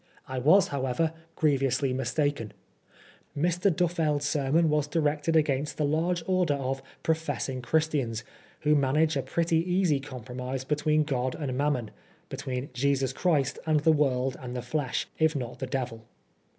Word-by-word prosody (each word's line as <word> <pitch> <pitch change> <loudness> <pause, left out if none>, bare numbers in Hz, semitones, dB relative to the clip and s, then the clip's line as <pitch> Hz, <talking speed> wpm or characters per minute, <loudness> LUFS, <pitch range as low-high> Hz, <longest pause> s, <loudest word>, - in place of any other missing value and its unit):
I 130 0 -3
was, 185 +9 +5
however, 140 +4 0 0.2
greviously 135 -3 +1
mistaken. 135 -2 -1 0.8
Mr. 175 +5 +2
Duffeld's 160 -4 +1
sermon 150 +3 +2
was 150 -1 +1
directed 150 +1 0
against 150 -2 +1
the 150 - +1
large 165 +4 0
order 185 -5 +2
of 135 -1 -3 0.2
"professing 145 -5 -1
Christians," 135 -6 0 0.4
who 150 +1 +3
manage 150 +2 +2
a 135 - +1
pretty 165 +5 0
easy 175 -3 +2
compromise 125 0 -6
be 150 +3 0
tween 155 0 +2
God 130 -3 -1
and 140 -5 -3
Mammon, 130 -5 0 0.4
between 130 +1 -4
Jesus 135 +1 +1
Christ 150 -7 +1
and 155 -2 +3
the 160 +1 +5
world 135 -3 +1
and 125 -1 -6
the 125 - -3
flesh, 145 -5 -1
if 160 0 +3
not 125 -4 -4
the 130 - -3
Devil. 125 -4 -3
145 Hz, 150 wpm, -28 LUFS, 130-160 Hz, 0.8 s, was